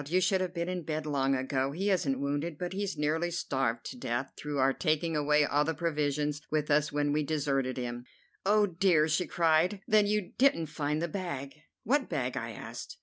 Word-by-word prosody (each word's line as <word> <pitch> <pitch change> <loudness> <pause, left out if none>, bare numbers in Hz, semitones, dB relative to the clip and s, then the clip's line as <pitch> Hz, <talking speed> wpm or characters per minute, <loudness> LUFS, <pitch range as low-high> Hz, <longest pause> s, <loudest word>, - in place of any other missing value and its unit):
You 180 +4 +2
should 190 +1 +2
have 185 -1 -1
been 170 0 -2
in 180 -1 -2
bed 155 -1 -3
long 135 -2 +1
ago! 130 +1 -1
He 195 +5 0
isn't 140 -8 +1
wounded, 145 +3 -2
but 180 +2 -4
he's 200 -3 -3
nearly 155 +3 0
starved 135 -8 -1
to - - -9
death 125 - -2
through 150 -1 -4
our 135 0 +3
taking 155 +1 0
away 150 0 +3
all 145 +1 +2
the 160 +1 -1
provisions 150 -2 -1
with 150 -1 0
us 150 +1 +3
when 145 0 0
we 150 - +2
deserted 140 -4 -1
him." 120 -1 -4 0.4
"Oh, 210 +1 +4
dear!" 175 -4 +3
she 160 +3 +1
cried. 170 +4 +2
"Then 215 -1 +4
you 210 -3 0
didn't 165 - +3
find 150 +1 -1
the - - 0
bag." 150 -7 -4 0.3
"What 270 +3 +1
bag?" 125 -2 -2
I 115 -3 -3
asked. 110 - -8
150 Hz, 205 wpm, -30 LUFS, 140-175 Hz, 0.4 s, Oh